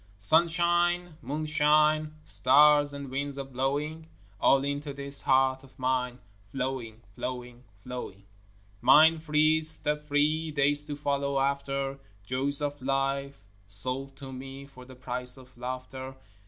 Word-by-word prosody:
Sun 160 - +4
shine, 175 0 +1
moon 150 +5 -4
shine, 155 0 +2
Stars, 145 +2 +5
and 140 -2 -7
winds 140 +1 -3
a 140 - -3
blowing, 140 +5 -3 0.3
All 135 0 +4
into 145 +1 -3
this 140 0 -4
heart 130 0 +2
of 130 -1 -19
mine 125 -1 -1 0.3
Flowing, 125 -4 -4
flowing, 125 +1 -7 0.2
flowing! 125 -6 -8 0.6
Mind 155 +5 +6
free, 155 0 +2
step 150 -1 0
free, 155 +2 +1
Days 145 0 +1
to 145 -1 -5
follow 140 -1 -1
after, 140 0 -2 0.2
Joys 135 +6 0
of 145 -1 -3
life 135 -2 -2 0.2
sold 130 +7 0
to 135 -1 -10
me 135 +1 -9
For 130 -2 -14
the 130 0 -13
price 125 0 +2
of 130 0 -16
laughter. 130 +2 -7
140 Hz, 135 wpm, -28 LUFS, 130-150 Hz, 0.6 s, Mind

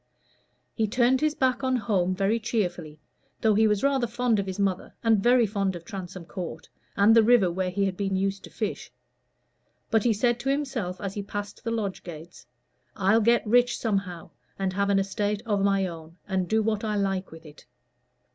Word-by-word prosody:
He 220 -2 0
turned 245 +4 +2
his 305 0 +1
back 260 -1 +1
on 260 0 +1
home 195 -6 0
very 200 +4 +1
cheerfully, 175 -9 -3 0.4
though 220 -1 +3
he 220 +2 +4
was 210 +1 0
rather 270 -3 +2
fond 235 -1 +1
of 195 - -2
his 190 - -4
mother, 195 -2 -1
and 225 -3 +3
very 245 +1 +4
fond 195 -2 -1
of 170 -1 -9
Transome 185 -3 -7
Court, 170 -2 -7 0.3
and 205 +3 +6
the 230 - +8
river 220 -5 +4
where 185 +1 -1
he 200 +2 0
had 190 -1 -2
been 195 -1 -1
used 195 +1 -1
to - - -12
fish; - - -4 1.0
but 225 -2 +3
he 240 - +3
said 240 +3 +1
to 270 +3 -2
himself 265 -10 -2
as 195 -2 -4
he 205 - -4
passed 205 +1 -6
the 230 - -2
lodge 215 -4 -2
gates, 170 0 -11 0.5
"I'll 215 +2 +3
get 235 +2 +3
rich 240 +2 +3
somehow, 195 -6 -3 0.3
and 190 -1 -1
have 200 +1 0
an 200 - +3
estate 205 +2 -1
of 205 -3 0
my 195 -1 +2
own, 165 -1 -9
and 190 -2 -1
do 220 0 +2
what 215 0 -1
I 215 -1 -1
like 195 -2 -1
with 160 0 -13
it." 150 -1 -15
200 Hz, 200 wpm, -26 LUFS, 190-230 Hz, 1.0 s, the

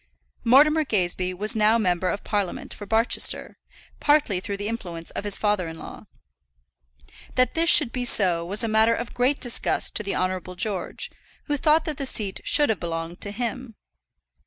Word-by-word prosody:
Mortimer 300 +6 +5
Gazebee 185 -7 -1
was 210 +4 -1
now 215 +1 +3
member 185 -4 0
of 205 - -4
Parliament 205 -4 -3
for 205 - -10
Barchester, 225 +3 +1 0.4
partly 290 -10 +2
through 200 +2 -5
the 205 +1 -4
influence 175 -7 -5
of - - -5
his 205 -1 +1
father 205 -4 0
in 160 0 -8
law. - - -11 1.3
That 255 -1 +2
this 335 +1 +1
should 290 -9 +5
be 250 0 -3
so 180 -8 +4
was 200 +7 +1
a - - 0
matter 220 +1 +3
of 235 +1 -6
great 255 +3 0
disgust 245 -2 +2
to - - 0
the 200 -1 -3
Honourable 185 0 -3
George, 190 -2 -4 0.3
who 295 - -2
thought 305 +3 +2
that 305 -3 -4
the 275 - -1
seat 200 -6 0
should 295 -1 +2
have 220 - 0
belonged 165 +1 -5
to 205 - +1
him. 240 +1 -5
215 Hz, 180 wpm, -24 LUFS, 185-245 Hz, 1.3 s, Mortimer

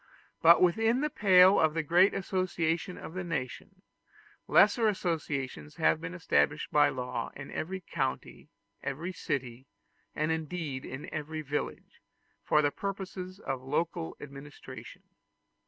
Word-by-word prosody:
But 170 +2 +7
within 225 +8 +3
the 300 0 0
pale 190 -3 +6
of 160 0 +3
the 165 - 0
great 175 +6 +5
association 180 -2 -1
of - - -8
the 185 0 -4
nation, 140 -8 -5 0.6
lesser 220 +2 +5
associations 155 -7 -2
have 160 -1 +2
been 180 +2 -5
established 155 -3 +1
by 150 - +5
law 125 -2 -4
in 135 0 -8
every 190 +3 -4
country, 135 -6 -4 0.3
every 155 +7 -4
city, 130 -6 -4 0.5
and 155 +1 0
indeed 160 -4 -3
in 130 +2 -7
every 155 0 -4
village, 145 +1 -5 0.4
for 150 - +3
the 145 - +2
purposes 190 -1 -5
of 135 -9 -4
local 165 +5 -2
administration. 140 -2 -10
160 Hz, 130 wpm, -30 LUFS, 145-185 Hz, 0.6 s, But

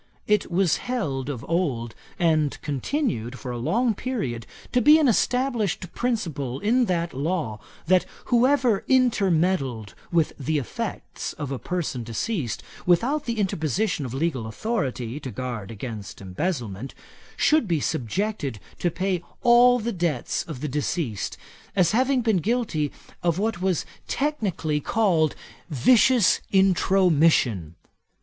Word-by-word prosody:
It 210 -1 +2
was 175 -1 +2
held 145 - -3
of 135 -2 -5
old, 135 -10 -1 0.2
and 155 -5 +2
continued 140 - -2
for 125 - -6
a 120 - -4
long 230 - +1
period, 140 - -3 0.2
to 250 - +3
be 300 +3 +8
an 310 -3 +3
established 240 -5 0
principle 160 - -2
in 240 +5 +3
that 170 -4 -1
law, 140 -6 -2 0.3
that 185 +2 +3 0.2
whoever 245 -3 +3
intermeddled 185 - +2 0.2
with 165 -3 +2
the 150 +3 0
effects 140 - -4
of 145 -3 -5
a 135 - -3
person 175 -8 -3
deceased, 120 - -3 0.2
without 255 - +2
the 235 -1 -2
interposition 185 - 0
of 125 - -5
legal 135 -6 -1
authority 130 - -2
to 135 - -6
guard 120 -3 -5
against 110 -2 -7
embezzlement, 115 - -4 0.4
should 305 -7 +3
be 170 -4 +1
subjected 140 - -2 0.2
to 175 - +1
pay 185 +1 -1 0.2
all 245 0 +7
the 235 0 -2
debts 170 -8 -1
of 150 -6 -7
the 150 - -2
deceased, 145 - -2 0.4
as 180 -4 +4
having 255 +3 +2
been 220 -4 +2
guilty 180 - 0 0.3
of 170 -1 +1
what 210 -2 -1
was 185 -4 0 0.2
technically 205 - -1
called 165 -4 +2 0.3
vicious 215 - +4
intromission. 165 - +3
170 Hz, 130 wpm, -25 LUFS, 135-220 Hz, 0.4 s, be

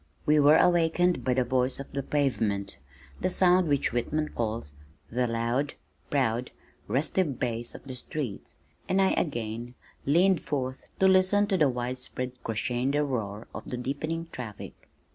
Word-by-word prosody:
We 150 0 +5
were 145 +2 +7
awakened 175 +1 +3
by 125 -1 +1
the 130 - +3
voice 125 +1 0
of 140 - -8
the 140 - -2
pavement, 110 - 0 0.4
that - - +1
sound 180 -1 +5
which 140 -5 +1
Whitman 150 +6 0
calls 110 -9 -3 0.4
"the 125 +1 +1
loud, 120 +5 -1 0.3
proud, 125 -3 +1 0.4
restive 150 +1 0
bass 120 -1 -3
of - - -10
the 135 - -7
streets," 125 -2 -4 0.3
and 190 - +3
again 120 - 0
I - - -12
leaned 180 +3 +4
forth 130 -2 -3
to 190 - +5
listen 190 +2 +5
to 200 -2 +1
the 150 -3 +5
widespread 125 +1 -3
crescendo 125 +6 0
roar 110 -6 -3
of - - -7
the 125 - -3
deepening 155 +6 -3
traffic. 110 -5 -8
130 Hz, 150 wpm, -28 LUFS, 120-155 Hz, 0.4 s, were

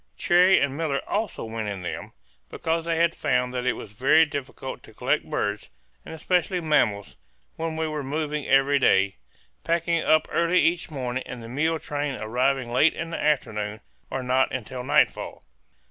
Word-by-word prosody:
Cherrie 180 +2 +5
and 140 -1 0
Miller 150 -3 -1
also 210 - -2
went 110 -1 -4
in 95 -3 -5
them, - - -6 0.4
because 165 0 -2
they 165 -1 0
had 170 0 +3
found 125 -5 0
that 125 0 -2
it 125 - +3
was 100 - -9
very 140 +9 +4
difficult 140 -3 -6
to - - -16
collect - - 0
birds, 105 0 -2 0.3
and 160 - -8
especially 180 +2 0
mammals, 120 - +1 0.4
when 160 0 -3
we 160 0 0
were 155 -1 -3
moving 150 +1 -3
every 135 +1 +4
day, 95 -5 +3 0.5
packing 170 0 +1
up 155 0 +3
early 170 +2 +3
each 170 +1 +1
morning 130 -4 -3
and 125 - -7
the - - -8
mule 155 +7 0
train 145 -2 -3
arriving 125 +3 0
late 150 +6 +4
in 165 0 -5
the - - -3
afternoon 105 -8 0 0.3
or 135 - -3
not 130 +1 +2
until 125 0 -5
nightfall. - - +1
140 Hz, 175 wpm, -25 LUFS, 125-160 Hz, 0.5 s, Cherrie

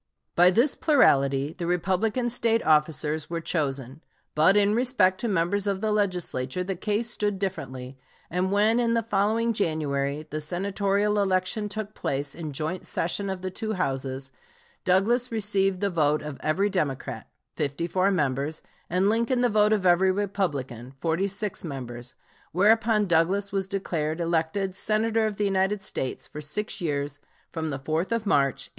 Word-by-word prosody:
By 175 +1 +7
this 235 +10 +3
plurality 140 - +3
the 170 -2 -4
Republican 195 +7 0
State 230 -1 +1
officers 150 0 +2
were 170 0 -2
chosen. 140 -4 -3 0.3
But 165 +7 +4
in 205 0 +4
respect 215 -6 +2
to 235 - -1
members 195 +1 0
of 195 -1 0
the 215 +1 0
Legislature 180 -7 -1
the 190 +1 -3
case 215 +5 -1
stood 205 -2 -1
differently, 130 -9 -5 0.3
and 180 +2 -1
when 215 +4 +3
in 235 -1 +2
the 230 - +1
following 220 +2 +1
January 150 -6 -1
the 155 0 -4
Senatorial 200 +5 0
election 195 +2 0
took 215 0 -5
place 140 +1 -2
in 160 -3 -6
joint 155 +5 -4
session 195 +4 -1
of 190 -1 -4
the 185 - -3
two 220 +3 -3
Houses, 135 -5 -2 0.5
Douglas 235 +7 +2
received 195 -4 +1
the 200 -1 +1
vote 150 -3 +1
of 150 -2 -7
every 160 +7 +1
Democrat, 150 -8 -3 0.3
54 170 +6 0
members, 150 -3 -1 0.3
and 185 +3 +2
Lincoln 235 +3 +1
the 245 - +3
vote 210 -1 +3
of 205 -3 +1
every 185 +1 +5
Republican, 145 - -3
46 195 +5 -1
members, 125 -5 -7 0.4
whereupon 215 +4 +3
Douglas 185 +4 +1
was 195 -1 -1
declared 170 -5 -2
elected 170 +3 -1
Senator 220 +2 +1
of 210 - -4
the 205 - 0
United 195 +1 +1
States 130 -8 -3
for 150 - -8
six 200 +7 -3
years 145 -3 -2 0.3
from 160 -1 -3
the 140 - -3
4th 155 - -2
of 230 -1 0
March, 140 -8 +1
1859. - - -29
185 Hz, 160 wpm, -26 LUFS, 155-210 Hz, 0.5 s, By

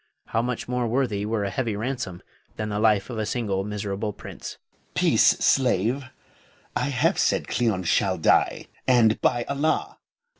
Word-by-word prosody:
How 115 - +1
much 125 0 -3
more 125 -1 -1
worthy 115 -4 0
were 110 -2 -1
a 100 - -2
heavy 115 +1 -1
ransom 110 -5 -4 0.3
than 110 0 -3
the 105 0 -2
life 105 0 +2
of 115 - -4
a 110 - -1
single 105 -5 -1
miserable 105 0 -3
prince. - - -9
Moh'd. - - -39
Peace, - - +4
slave! 125 +1 +2 0.7
I - - +1
have - - +1
said - - +1
Cleon 110 -6 0
shall 95 +2 +1
die, 80 - +2 0.2
and, 120 -4 +4
by 120 -1 +2
Allah! 140 +4 -1
110 Hz, 160 wpm, -25 LUFS, 100-125 Hz, 0.7 s, Peace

